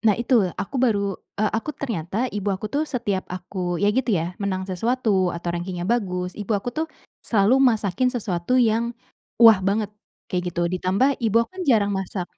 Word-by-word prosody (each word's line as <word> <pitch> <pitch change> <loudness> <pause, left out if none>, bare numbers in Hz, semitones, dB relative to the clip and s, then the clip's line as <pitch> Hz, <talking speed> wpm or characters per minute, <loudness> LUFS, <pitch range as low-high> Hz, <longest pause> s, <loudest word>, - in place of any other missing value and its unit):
Nah 215 -3 +3
itu, 235 -5 +2
aku 260 - -4
baru 200 -5 +2 0.2
eee, 215 0 +1
aku 225 +7 -2
ternyata, 220 - -2
ibu 205 -1 -2
aku 195 +2 -2
tuh 295 +2 +1
setiap 205 -7 -2
aku 180 0 -4
ya 205 +3 +2
gitu 255 0 0
ya, 165 +2 -2
menang 190 -2 -1
sesuatu 195 -1 +1
atau 170 0 -4
rangkingnya 175 0 -4
bagus, 180 -4 -1
ibu 210 +1 -4
aku 240 +5 -4
tuh, 315 +4 -2 0.3
selalu 225 +5 +3
masakin 225 -2 +2
sesuatu 210 -3 -1
yang, 235 0 +2 0.4
wah 225 -4 +8
banget, 205 +2 0 0.4
kayak 180 -1 -1
gitu, 175 -1 0
ditambah 195 +11 +1
ibu 225 -2 +1
aku - - -25
kan - - -1
jarang 205 -5 +4
masak 190 -1 -3
205 Hz, 180 wpm, -23 LUFS, 185-235 Hz, 0.4 s, wah